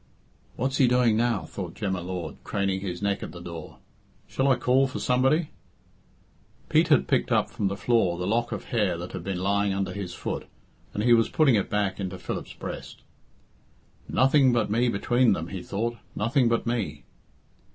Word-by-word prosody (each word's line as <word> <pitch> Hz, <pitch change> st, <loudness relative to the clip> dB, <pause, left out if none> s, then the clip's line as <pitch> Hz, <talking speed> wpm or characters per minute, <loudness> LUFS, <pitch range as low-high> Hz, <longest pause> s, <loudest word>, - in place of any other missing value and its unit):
"What's 130 Hz, +3 st, -1 dB
he 130 Hz, -, +5 dB
doing 120 Hz, -2 st, +3 dB
now?" 115 Hz, -2 st, +1 dB
thought 90 Hz, -4 st, -7 dB
Jem 100 Hz, -3 st, -2 dB
y 95 Hz, -, -2 dB
Lord, 90 Hz, 0 st, -5 dB
craning 100 Hz, -1 st, -1 dB
his 90 Hz, -1 st, -5 dB
neck 100 Hz, -1 st, 0 dB
at -, -, -7 dB
the 85 Hz, -, -9 dB
door. 85 Hz, -2 st, -8 dB, 0.5 s
"Shall 135 Hz, -, -1 dB
I 135 Hz, -, +5 dB
call 130 Hz, +3 st, +3 dB
for 130 Hz, -, -6 dB
somebody?" 135 Hz, +6 st, +2 dB, 1.2 s
Pete -, -, +4 dB
had -, -, +4 dB
picked -, -, +1 dB
up -, -, +2 dB
from 100 Hz, -, -1 dB
the 100 Hz, +1 st, -3 dB
floor 100 Hz, -6 st, +2 dB
the 90 Hz, -, -3 dB
lock 115 Hz, +4 st, 0 dB
of -, -, -4 dB
hair 105 Hz, -7 st, +1 dB
that 85 Hz, +1 st, -7 dB
had 85 Hz, -, -6 dB
been 95 Hz, 0 st, -3 dB
lying 100 Hz, +1 st, +1 dB
under 95 Hz, 0 st, -2 dB
his 95 Hz, -4 st, -5 dB
foot, -, -, -4 dB, 0.5 s
and 105 Hz, -, -1 dB
he 120 Hz, 0 st, +5 dB
was 115 Hz, -1 st, +4 dB
putting 155 Hz, -5 st, +4 dB
it 100 Hz, -3 st, +1 dB
back 105 Hz, -1 st, -1 dB
into 95 Hz, -1 st, -4 dB
Philip's -, -, -5 dB
breast. -, -, -8 dB, 1.1 s
"Nothing 135 Hz, 0 st, +4 dB
but 115 Hz, -4 st, +1 dB
me 120 Hz, +3 st, +2 dB
between 120 Hz, +3 st, +3 dB
them," 80 Hz, -1 st, -4 dB
he 95 Hz, -, -5 dB
thought, 115 Hz, +6 st, -3 dB, 0.2 s
"nothing 120 Hz, +3 st, +2 dB
but 115 Hz, -, 0 dB
me." 115 Hz, -4 st, -2 dB
105 Hz, 190 wpm, -26 LUFS, 95-120 Hz, 1.2 s, he